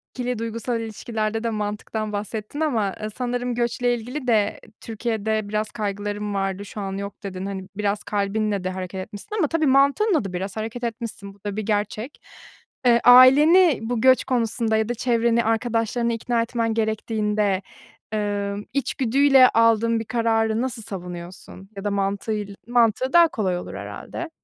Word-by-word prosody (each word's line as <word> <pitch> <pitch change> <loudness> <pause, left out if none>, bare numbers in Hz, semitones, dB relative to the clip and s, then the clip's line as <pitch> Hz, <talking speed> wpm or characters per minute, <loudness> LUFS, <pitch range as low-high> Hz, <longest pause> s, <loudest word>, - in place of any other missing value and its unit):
ikili 250 -2 -2
duygusal 230 +1 -3
ilişkilerde 220 0 -3
de 230 - 0
mantıktan 210 0 -3
bahsettin 210 +5 -5
ama, 230 -11 0
ııı, 215 - -3
sanırım 245 +1 -2
göçle 245 +1 0
ilgili 250 +4 -6
de 215 -3 +2 0.2
Türkiye'de 220 -2 -2
biraz 215 0 -2
kaygılarım 205 0 -3
vardı, 195 0 -2
şu 205 +1 -7
an 195 -1 -4
yok, 200 +1 -7
dedin. 190 -1 -5
Hani, 190 -1 -5
biraz 205 0 -1
kalbinle 205 -1 -1
de 185 - -1
hareket 185 0 -5
etmişsin 205 - -8
ama 335 -7 +2
tabii 315 0 +1
mantığınla 280 - +3
da 190 - -5
biraz 190 +3 -4
hareket 225 +3 -5
etmişsin. 225 -4 -5
Bu 200 - -24
da 205 -1 -3
bir 215 - -1
gerçek. 215 +4 -2 0.7
Eee, 235 -1 +5
aileni 290 +7 +7
bu 225 0 -2
göç 260 -1 +5
konusunda 230 -2 0
ya 220 +1 0
da - - +1
çevreni, 235 -1 +2
arkadaşlarını 230 +1 0
ikna 230 +1 0
etmen 230 -1 -1
gerektiğinde, 215 -2 0 0.5
ımm, 205 -1 -2
içgüdüyle 270 0 +4
aldığın 230 0 +3
bir 225 - -5
kararı 225 -1 +1
nasıl 255 -2 -3
savunuyorsun? 180 0 -8
Ya 195 - -6
da 205 - -1
mantığıyla, 200 +1 -2
mantığı 240 +1 +2
daha 340 -1 +7
kolay 195 - -1
olur - - -8
herhâlde. 340 - -7
220 Hz, 155 wpm, -23 LUFS, 205-240 Hz, 0.7 s, aileni